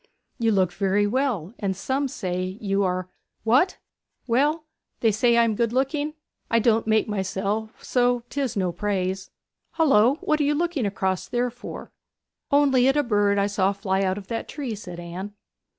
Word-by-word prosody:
'You 225 -1 +2
look 185 -3 +2
very 200 +1 +1
well; 220 - -1
and 195 -3 -1
some 270 +7 -1
say, 185 -4 -3
you 200 -1 0
are 185 -1 -1 0.2
' - - -51
'What? 255 +12 +3 0.5
Well, 290 +6 +1 0.4
they 225 - +4
say 235 +3 +3
I 235 - +6
am 230 -1 +1
good 230 +1 0
looking. 290 +4 -1 0.3
I 230 - +3
don't 225 -1 +2
make 220 0 +3
myself, 205 +2 -3
so 245 -1 +1
'tis 275 -6 -2
no 185 -2 +1
praise. 190 0 -2 0.4
Hullo! 270 -6 +4
what 305 0 +1
are - - +3
you 290 +1 +2
looking 325 -7 0
across 190 -2 -1
there 245 0 0
for?' 245 +1 -9 0.6
'Only 275 -3 +4
at 270 +2 +3
a 295 - +3
bird 205 -4 +2
that 200 - +3
I - - +2
saw 200 -1 +1
fly 195 -1 -1
out 190 0 0
of 205 - -7
that 230 -1 -3
tree,' 270 -6 -4
said 180 -5 -8
Anne. 180 +4 -7
220 Hz, 180 wpm, -24 LUFS, 195-255 Hz, 0.6 s, I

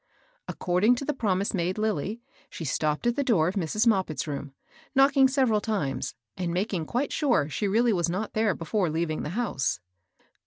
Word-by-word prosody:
According 190 +7 +2
to 275 - -5
the 295 - 0
promise 200 -6 0
made 185 0 -1
Lilly, 215 +1 -2 0.3
she 165 - -7
stopped 150 - -1
at 240 0 +2
the 285 - 0
door 195 -12 +3
of 180 - -1
Mrs. 200 +3 0
Moppit's 190 -9 +1
room, 145 -2 -5 0.4
knocking 270 0 +6
sev 265 -1 +2
eral 210 -1 +2
times, 195 - -2 0.2
and 175 -2 -2
making 180 -2 -1
quite 260 +4 -1
sure 245 - +2
she 200 +7 -2
really 225 +3 +3
was 175 -2 +1
not 195 +5 -3
there 215 -3 +1
before 180 +2 -1
leaving 160 0 -1
the - - -4
house. 130 - -1
200 Hz, 185 wpm, -27 LUFS, 165-235 Hz, 0.4 s, knocking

